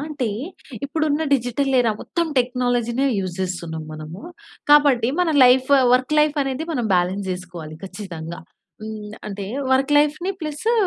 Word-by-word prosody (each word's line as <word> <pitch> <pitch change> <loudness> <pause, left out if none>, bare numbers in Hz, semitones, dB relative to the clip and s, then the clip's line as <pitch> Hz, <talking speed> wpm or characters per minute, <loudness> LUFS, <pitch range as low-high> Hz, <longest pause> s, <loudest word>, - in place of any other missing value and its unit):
అంటే 285 -6 -2 0.6
ఇప్పుడు 310 +2 -1
ఉన్న 295 +2 +1
డిజిటల్ 270 +2 -1
ఎరా 235 - +2
మొత్తం 340 -1 -1
టెక్నాలజీ‌నే 245 0 0
యూజ్ 185 -2 -3
చేస్తున్నాం 170 -4 -4
మనము. 155 +3 -8 0.5
కాబట్టి 285 -6 +5
మన 350 -2 +2
లైఫ్, 255 +2 +4 0.2
వర్క్ 255 +4 +1
లైఫ్ 300 0 +2
అనేది 270 +3 -3
మనం 245 -6 -1
బాలన్స్ 185 +2 0
చేసుకోవాలి 180 -4 -7
ఖచ్చితంగా. 175 -4 -7 0.4
హ్మ్, 215 -1 -7
అంటే 200 -1 -5 0.3
వర్క్ 270 +2 +2
లైఫ్‌ని 300 +5 +1
ప్లసు 310 +8 -1
245 Hz, 140 wpm, -22 LUFS, 185-285 Hz, 0.6 s, కాబట్టి